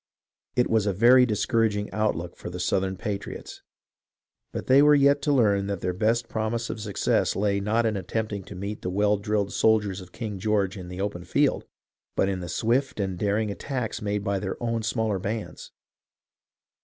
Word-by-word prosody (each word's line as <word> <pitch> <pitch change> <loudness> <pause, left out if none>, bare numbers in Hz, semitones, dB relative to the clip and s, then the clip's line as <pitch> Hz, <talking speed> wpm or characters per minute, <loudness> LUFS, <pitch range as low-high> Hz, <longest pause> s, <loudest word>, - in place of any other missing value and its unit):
It 125 - +3
was 110 -2 +2
a 100 - +1
very 125 +5 +6
discouraging 105 -1 0
outlook 90 -6 -1
for - - -8
the 90 +1 -6
Southern 95 +1 0
patriots, 100 +1 -6 0.9
but - - -5
they 135 +2 +6
were 150 0 +7
yet 140 0 +4
to 150 - +1
learn 100 -7 +3
that 100 -3 -3
their 90 0 -1
best 115 +5 +1
prom 110 +1 -2
ise 115 0 -3
of 110 - -6
success 105 -2 0
lay 100 0 +1
not 110 +4 +1
in 110 -1 +1
attempting 100 +1 -3
to 100 - -9
meet 100 +3 -5
the - - -3
well 105 +2 +2
drilled 100 0 -1
soldiers 105 -3 +2
of 90 -1 -13
King 105 -4 -5
George 100 -1 +1
in 90 -3 -8
the 90 +1 -7
open 95 -3 -3
field, - - +1 0.5
but 95 - +2
in 95 -1 -2
the 90 -1 -6
swift 120 +7 0
and 95 -3 -2
daring 105 +1 0
attacks 125 +1 -4
made 105 -1 -2
by 100 -2 0
their 95 -1 -4
own 115 -1 -1
smaller 110 -2 -1
bands. 100 -4 -5
105 Hz, 190 wpm, -26 LUFS, 95-115 Hz, 0.9 s, were